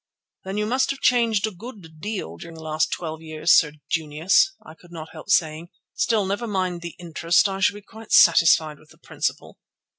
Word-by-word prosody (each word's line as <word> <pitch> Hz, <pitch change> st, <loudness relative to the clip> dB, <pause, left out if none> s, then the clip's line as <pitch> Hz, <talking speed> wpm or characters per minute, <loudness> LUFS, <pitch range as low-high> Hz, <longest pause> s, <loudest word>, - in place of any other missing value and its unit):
"Then 190 Hz, +2 st, -5 dB
you 210 Hz, -, 0 dB
must 255 Hz, +4 st, 0 dB
have 275 Hz, -, -3 dB
changed 230 Hz, -4 st, +2 dB
a 220 Hz, -, -4 dB
good 185 Hz, -6 st, -12 dB
deal 200 Hz, -, -5 dB
during 165 Hz, -, -11 dB
the 160 Hz, -, -11 dB
last 155 Hz, 0 st, -1 dB
twelve 160 Hz, -2 st, -5 dB
years, 155 Hz, +1 st, +1 dB
Sir 150 Hz, -2 st, +3 dB
Junius," 160 Hz, -, +1 dB
I 155 Hz, -, -12 dB
could 170 Hz, +1 st, -20 dB
not 160 Hz, -2 st, -9 dB
help -, -, -12 dB
saying. 160 Hz, -3 st, +1 dB, 0.2 s
"Still, 220 Hz, -4 st, +1 dB
never 205 Hz, +5 st, -3 dB
mind 185 Hz, -4 st, -2 dB
the 170 Hz, -2 st, -8 dB
interest, 170 Hz, +1 st, +1 dB
I 195 Hz, 0 st, -4 dB
shall 200 Hz, +1 st, +2 dB
be 205 Hz, -, -11 dB
quite 220 Hz, +1 st, -14 dB
satisfied 155 Hz, -3 st, +5 dB
with 155 Hz, -, -22 dB
the -, -, -20 dB
principal." -, -, -5 dB
175 Hz, 200 wpm, -23 LUFS, 160-210 Hz, 0.2 s, satisfied